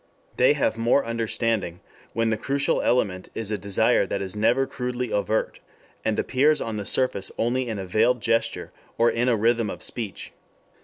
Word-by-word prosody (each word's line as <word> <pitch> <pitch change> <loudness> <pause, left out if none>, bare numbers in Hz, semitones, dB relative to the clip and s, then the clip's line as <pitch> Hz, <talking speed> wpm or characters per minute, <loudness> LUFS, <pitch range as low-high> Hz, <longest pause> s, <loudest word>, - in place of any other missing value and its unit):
They 130 +3 +5
have 140 -6 0
more 120 +4 +3
understanding 115 -5 -1 0.3
when 115 0 +1
the - - +2
crucial 140 +5 0
element 95 -7 0
is 110 -2 -4
a - - +1
desire 100 -1 +2
that - - -2
is 95 +1 -5
never 120 +5 +2
crudely 125 -2 -4
overt, 110 +2 -1 0.4
and 110 -1 0
appears 145 +4 +2
on 110 -2 -3
the 100 - -4
surface 115 -7 0
only 125 +2 0
in 110 -3 -3
a 95 - -4
veiled 115 +7 +2
gesture, 115 +1 -1 0.3
or 120 +1 +4
in 120 +2 +1
a 115 - +3
rhythm 115 0 +2
of - - -6
speech. 110 -6 -5
115 Hz, 175 wpm, -24 LUFS, 105-125 Hz, 0.4 s, They